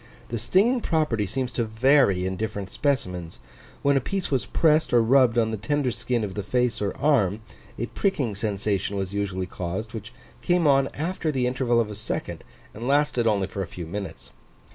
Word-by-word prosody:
The 115 - -3
stinging 210 - +3
property 150 - 0
seems 125 +4 -3
to 120 - 0
vary 110 -4 +3
in 95 0 -2
different 100 -2 -4
specimens: 90 - -2 0.4
when 140 0 +4
a - - +1
piece 195 +4 -3
was 135 -3 0
pressed 155 -3 +2
or 120 -1 +5
rubbed 125 0 +4
on 110 -1 +2
the 110 - -2
tender 130 +5 0
skin 120 0 -1
of 100 -2 -4
the 105 - -3
face 125 +4 0
or 100 -2 -2
arm, 110 -9 +2 0.4
a 120 - -1
pricking 140 - -1
sensation 100 -1 -1
was 95 0 -3
usually 100 -2 -2
caused, 95 +5 -5
which 110 -4 -7 0.3
came 175 -1 +2
on 135 -2 +4
after 160 +1 -2
the 130 -3 0
interval 125 -1 +1
of 110 -2 0
a - - -6
second, 105 - -4 0.3
and 115 +4 -6
lasted 140 -4 +2
only 100 -3 +2
for 100 - -5
a 95 - -3
few 85 +1 -7
minutes. 80 -9 -7
115 Hz, 190 wpm, -25 LUFS, 100-135 Hz, 0.4 s, or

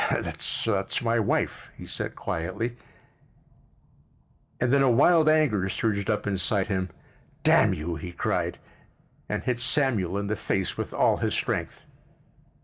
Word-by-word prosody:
"That's 100 -2 -1
my 115 0 +2
wife," 105 - -1
he - - -9
said - - -5
quietly, 95 +9 -3 1.8
and 120 +2 +1
then 140 - +5
a 135 - +4
wild 155 +6 +5
anger 130 -12 +2
surged 100 0 -1
up 105 - 0
inside 100 0 0
him. 95 -2 -1 0.5
"Damn - - +5
you!" 80 +2 -4
he 90 +3 -7
cried—and 85 - -5
hit 125 -2 -1
Samuel 120 - +2
in 100 - -2
the 105 +1 -1
face 95 -1 -2
with - - -4
all - - +3
his - - -1
strength. - - -3
105 Hz, 135 wpm, -26 LUFS, 95-120 Hz, 1.8 s, then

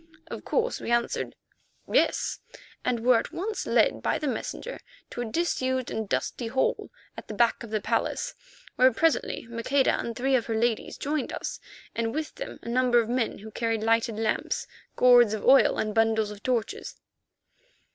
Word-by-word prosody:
Of - - -6
course 485 +1 0
we - - -5
answered 235 0 0 0.5
"Yes," - - +1 0.4
and 245 -2 0
were 245 0 +5
at - - -6
once 425 +5 -3
led - - +3
by - - +1
the 300 - -3
messenger - - -4 0.3
to 240 - -4
a - - -2
disused 260 -2 -1
and 220 -2 -3
dusty 240 - -2
hall 260 +3 0 0.3
at - - -9
the 215 - -6
back 235 +2 +2
of 235 - -7
the 215 -1 -1
palace, - - -1 0.4
where 255 +1 +6
presently 325 0 +1
Maqueda 240 +4 +1
and 235 - -4
three 265 +3 +1
of 240 - 0
her 225 - -1
ladies 230 0 0
joined 290 -1 -2
us, - - -5 0.3
and 230 +2 -2
with 310 0 -3
them - - -7
a - - -10
number 245 0 +3
of 230 -1 -1
men 245 -2 0
who 220 +2 -10
carried 225 -1 -1
lighted 225 -1 +2
lamps, 220 0 -1 0.3
gourds 245 -3 +6
of 215 - -6
oil, 270 +1 +6
and 215 0 -1
bundles 220 -1 +2
of 210 0 -10
torches. 245 -4 -2
235 Hz, 175 wpm, -27 LUFS, 225-260 Hz, 0.5 s, where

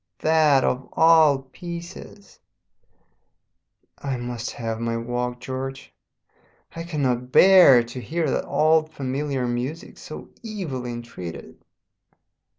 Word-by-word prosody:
"That 155 -4 +4
of 130 +1 -1
all 160 -4 +5
pieces! 175 +6 -10 1.6
"I 135 -2 -3
must 120 -1 -5
have 115 -1 -5
my 115 0 -2
walk, 120 +1 -3
George. 135 +1 -6 0.8
I 165 - -5
cannot 130 -7 -2
bear 180 -11 +7
to 120 +2 -8
hear 160 +8 -2
that - - -2
old 155 0 +2
familiar 135 0 -3
music 125 +7 -4
so - - -10
evilly 160 - -5
entreated. 120 -8 -9
135 Hz, 105 wpm, -23 LUFS, 120-160 Hz, 1.6 s, bear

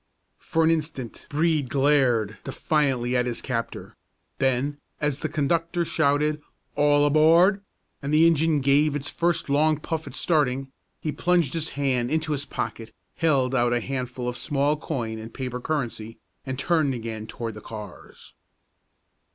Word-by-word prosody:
For 165 - 0
an 160 - +4
instant 150 -7 -4
Brede 155 -3 +1
glared 130 -6 +2
defiantly 135 -3 0
at 125 0 +2
his 120 - -3
captor; 115 -3 -4 0.4
then, 135 +2 0 0.2
as 150 -2 -1
the 155 - -2
conductor 165 +3 0
shouted 150 0 +1 0.3
"All 145 0 +4
aboard!" 165 +7 +5 0.4
and 140 0 -3
the 155 +2 +5
engine 160 -2 +3
gave 140 +2 +3
its 145 -1 -3
first 170 -1 0
long 150 +2 +3
puff 160 0 -4
at 135 - -8
starting, 135 -5 0 0.3
he 155 - -2
plunged 175 -4 +1
his 160 -2 -2
hand 130 -4 +1
into 155 0 -1
his 145 -1 -1
pocket, 115 -5 -5 0.3
held 135 -6 +2
out 120 -2 +2
a 120 - +2
handful 125 0 -4
of 125 - -3
small 145 +1 +1
coin 115 -7 -4
and 110 +1 -10
paper 125 -2 -4
currency, 120 -6 -3 0.3
and 130 0 -3
turned 150 -2 +1
again 110 -2 -6
toward 115 0 -5
the 105 - -10
cars. 105 -1 -10
140 Hz, 150 wpm, -25 LUFS, 125-155 Hz, 0.4 s, aboard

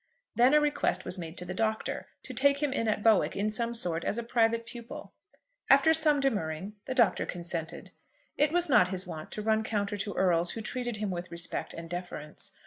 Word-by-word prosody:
Then 250 +5 +5
a - - +7
request 290 -11 0
was 180 +1 -4
made 165 0 -7
to 180 - -6
the 185 - -5
Doctor 220 +2 -2 0.2
to - - -8
take 280 +1 +3
him 285 -2 -1
in 230 -4 -1
at 210 -1 0
Bowick 220 -3 +4
in 210 +2 0
some 235 +2 -2
sort 170 -7 0
as 210 - -1
a 235 - -2
private 230 -1 +1
pupil. 235 0 -9 0.6
After 275 +4 +6
some 310 -2 +3
demurring 200 - -1
the 260 - -4
Doctor 235 -6 +3
consented. 170 -2 -5 0.4
It 295 0 +2
was 350 +1 +3
not 240 -10 +5
his 185 0 -2
wont 160 -3 -8
to 210 - -4
run 220 0 +2
counter 205 -1 -2
to 205 +1 -3
earls 175 -2 +2
who 225 - -5
treated 240 0 -4
him 210 -2 -2
with 175 0 -5
respect 170 0 -2
and 165 0 -7
deference. 175 -3 -6
215 Hz, 210 wpm, -29 LUFS, 180-245 Hz, 0.6 s, a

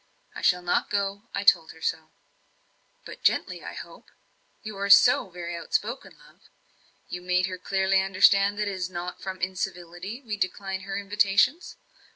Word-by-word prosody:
I - - -8
shall 180 -1 +2
not 175 - 0
go 200 +2 -2
I 200 - -2
told 200 -6 +4
her 160 - -18
so." 160 -1 -2 1.0
"But - - -10
gently, - - 0
I - - -7
hope? - - -11 0.5
you 215 -2 -7
are 200 0 -2
so 200 -1 +6
very 175 -1 -6
outspoken, 215 +8 -3
love. - - -21 0.7
You 180 - -6
made 180 0 +1
her 185 -1 -6
clearly 190 +1 +1
understand 195 +1 +4
that 210 0 -1
it - - -1
is 185 -1 -3
not 180 0 -6
from 190 -1 -6
incivility 185 +2 -4
we 215 -3 -4
decline 190 0 -3
her 195 +1 -5
invitations? 205 - +1
190 Hz, 165 wpm, -26 LUFS, 180-200 Hz, 1.0 s, so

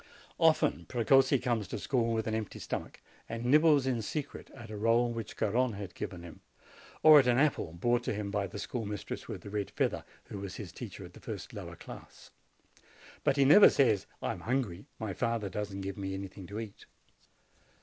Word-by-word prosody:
Often 160 -2 +3
Precossi 135 +3 +4
comes 115 -5 -1
to - - -4
school 120 -3 0
with 110 -1 -1
an 110 - -2
empty 110 -2 -3
stomach, - - -5 0.3
and 115 +1 -4
nibbles 150 +1 +5
in 125 -3 0
secret 145 +6 -5
at 115 -4 -10
a - - -5
roll 115 +3 +2
which 115 -2 -6
Garrone 120 +3 +1
has 100 -2 -7
given 85 -2 -6
him, 85 -3 -11 0.6
or 155 -1 +10
at 130 - +3
an 120 -1 +4
apple 135 - +1
brought 120 +8 +1
to - - 0
him 100 -1 -4
by 100 -1 -1
the 100 +3 -8
schoolmistress 105 -2 -5
with - - -6
the 100 - -9
red 100 -2 -2
feather, - - -1 0.2
who 100 - -8
was 95 -1 -6
his - - -7
teacher - - -8
in - - -12
the - - -14
first - - -7
lower - - -7
class. - - -12 0.9
But 135 - +2
he 140 - +5
never 200 +9 +9
say, 125 -6 +4 0.3
"I - - 0
am - - -6
hungry; 115 -7 -2
my 110 -3 -4
father 115 -2 -1
does 105 +2 -4
not 95 0 -5
give 100 0 -5
me 95 -1 -3
any 95 0 -5
thing 95 -1 -11
to 100 +4 -5
eat." 110 -3 -9
115 Hz, 205 wpm, -31 LUFS, 100-130 Hz, 0.9 s, or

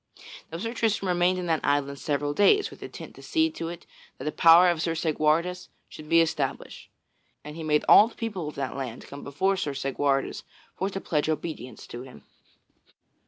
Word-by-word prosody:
Now 165 - -4
Sir 225 +6 -4
Tristram 215 -5 0
remained 180 +1 +2
in 180 - -3
that 165 -2 0
island 140 -1 0
several 145 0 -1
days, 400 - +4
with - - -14
intent - - -9
to - - -14
see 320 -1 +1
to 165 - -5
it 170 0 -9 0.3
that - - -8
the 150 - -2
power 170 +3 +7
of 165 -2 -3
Sir 165 -1 -1
Segwarides 160 +3 0 0.2
should 155 0 -11
be 165 0 +6
established. 150 -4 -3 0.5
And 150 +1 -9
he 165 - -7
made 150 -1 +1
all 210 - +8
the 230 - -14
people 205 -8 -4
of 150 - -7
that 135 -2 -4
land 130 -4 -6
come 140 - -10
before 190 +8 0
Sir 145 -7 -3
Segwarides 135 0 -1 0.3
for 190 - -2
to 195 - -5
pledge 155 -4 -1
obedience 155 -5 -5
to 120 - -8
him. 125 - -13
160 Hz, 195 wpm, -26 LUFS, 145-180 Hz, 0.5 s, all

